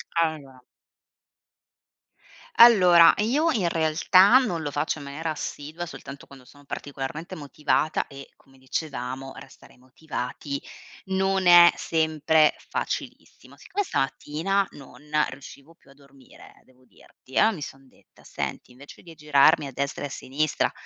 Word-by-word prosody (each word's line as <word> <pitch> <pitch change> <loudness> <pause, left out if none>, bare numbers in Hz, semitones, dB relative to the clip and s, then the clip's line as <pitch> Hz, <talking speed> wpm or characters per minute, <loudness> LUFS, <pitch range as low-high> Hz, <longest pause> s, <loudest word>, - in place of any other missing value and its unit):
Allora 150 -6 -2 1.9
allora, 180 -8 +7
io 275 +11 +1
in 195 -8 0
realtà 170 +7 +4
non 180 -11 -1
lo 145 - -4
faccio 145 +2 -2
in 140 - -10
maniera 155 +3 -5
assidua, 155 +3 -6
soltanto 140 -3 -11
quando 135 -2 -16
sono 145 +1 -19
particolarmente 140 +4 -7
motivata 150 +1 -1
e, 140 0 -12
come 135 -1 -25
dicevamo, 130 -1 -5
restare 135 - -15
motivati 135 +1 -7 0.4
non 190 -1 0
è 175 0 +8
sempre 160 -1 +1 0.2
facilissimo. - - -6
Siccome 410 - -4
stamattina 185 - -2
non 135 -1 -14 0.3
riuscivo 140 +3 -13
più 165 - -27
a - - -17
dormire, 140 -2 -19
devo 130 0 -27
dirti, 130 +2 -19
allora 220 -2 +3
mi 150 - -10
son 135 -1 -11
detta: - - -25
“Senti, - - -6
invece 135 +3 -15
di 165 -2 -14
girarmi 150 0 +3
a 135 - -7
destra 140 +2 -4
e - - -2
a - - -14
sinistra 140 +4 -2
150 Hz, 135 wpm, -24 LUFS, 135-170 Hz, 1.9 s, è